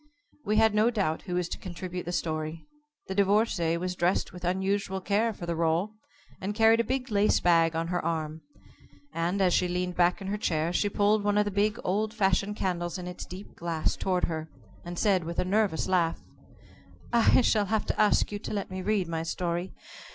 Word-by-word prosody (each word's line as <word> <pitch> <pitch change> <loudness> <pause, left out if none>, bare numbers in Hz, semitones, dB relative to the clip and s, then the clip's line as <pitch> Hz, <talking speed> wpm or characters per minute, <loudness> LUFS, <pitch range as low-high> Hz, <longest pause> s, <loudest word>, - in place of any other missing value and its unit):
We 210 - +1
had 220 -1 +5
no 215 +2 +4
doubt 195 -9 -1
who 180 - -2
was 180 -1 0
to - - -5
contribute 180 0 -6
the 175 - -3
story. 160 -2 -3 0.4
The 190 - -4
Divorcée 195 -4 +2
was 180 +1 -2
dressed 175 +2 0
with 180 -1 -10
unusual 190 +2 -1
care 210 +4 +1
for 190 -5 -8
the 170 - -1
rôle, 165 +4 0 0.5
and 205 +2 -3
carried 225 +1 +5
a - - +3
big 255 +1 -3
lace 205 0 +3
bag 165 -2 +3
on 165 +1 -1
her 175 0 -1
arm, 160 -1 -2 0.7
and, 170 +4 -1
as 180 -2 +3
she 180 - +2
leaned 180 0 -2
back 175 +2 +3
in 195 - -8
her 205 +2 -2
chair, 165 -2 0
she 205 - +1
pulled 205 +1 +2
one 205 0 +1
of 210 - +3
the 205 - -2
big 205 +2 +1
old 215 +4 -1
fashioned 200 0 +1
candles 175 -3 -2
in 180 - -6
its 180 0 -7
deep 185 +3 -10
glass 165 -2 -1
toward 180 -2 -1
her, 160 -1 -4 0.3
and 175 0 -7
said 190 -3 +2
with 170 +1 -6
a - - +1
nervous 200 -3 +1
laugh: 175 -3 +1 0.9
"I 235 +2 +5
shall 215 -4 +2
have 220 +1 0
to - - 0
ask 210 0 +3
you 205 - -4
to - - -6
let 200 -2 -3
me 185 0 -4
read 200 -2 0
my 165 -1 -2
story. 175 +2 -2
185 Hz, 210 wpm, -28 LUFS, 170-205 Hz, 0.9 s, had